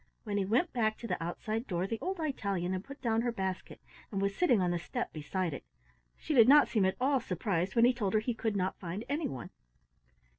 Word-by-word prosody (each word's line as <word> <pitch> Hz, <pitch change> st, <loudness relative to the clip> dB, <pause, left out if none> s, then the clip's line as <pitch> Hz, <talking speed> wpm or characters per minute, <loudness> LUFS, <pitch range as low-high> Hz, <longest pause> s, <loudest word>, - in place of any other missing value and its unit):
When 205 Hz, -2 st, -2 dB
he 195 Hz, -, +1 dB
went 245 Hz, -, +1 dB
back 220 Hz, -3 st, +1 dB
to 235 Hz, -, -7 dB
the -, -, -2 dB
outside 215 Hz, +7 st, -3 dB
door 175 Hz, -1 st, -1 dB
the 225 Hz, +3 st, -3 dB
old 380 Hz, -1 st, -3 dB
Italian 200 Hz, -, -1 dB
had 185 Hz, 0 st, -3 dB
put 275 Hz, +4 st, -11 dB
down 225 Hz, -1 st, +2 dB
her 240 Hz, 0 st, 0 dB
basket 190 Hz, -4 st, -4 dB, 0.3 s
and 195 Hz, -, -2 dB
was 200 Hz, 0 st, 0 dB
sitting 255 Hz, -, +3 dB
on 180 Hz, -1 st, +1 dB
the 175 Hz, -, 0 dB
step 175 Hz, -, -4 dB
beside 165 Hz, +2 st, -2 dB
it. -, -, -7 dB, 0.5 s
She 310 Hz, -, -3 dB
did 240 Hz, -3 st, +7 dB
not 295 Hz, +1 st, +8 dB
seem 210 Hz, -5 st, +2 dB
at 190 Hz, -, 0 dB
all 270 Hz, +1 st, +3 dB
surprised 185 Hz, -2 st, -2 dB
when 230 Hz, 0 st, +6 dB
he 250 Hz, -, +5 dB
told 215 Hz, -5 st, -1 dB
her -, -, +5 dB
he 235 Hz, +3 st, -2 dB
could 225 Hz, -2 st, -2 dB
not 185 Hz, -1 st, -1 dB
find 185 Hz, +5 st, -5 dB
anyone. 135 Hz, -, -3 dB
215 Hz, 230 wpm, -32 LUFS, 185-240 Hz, 0.5 s, not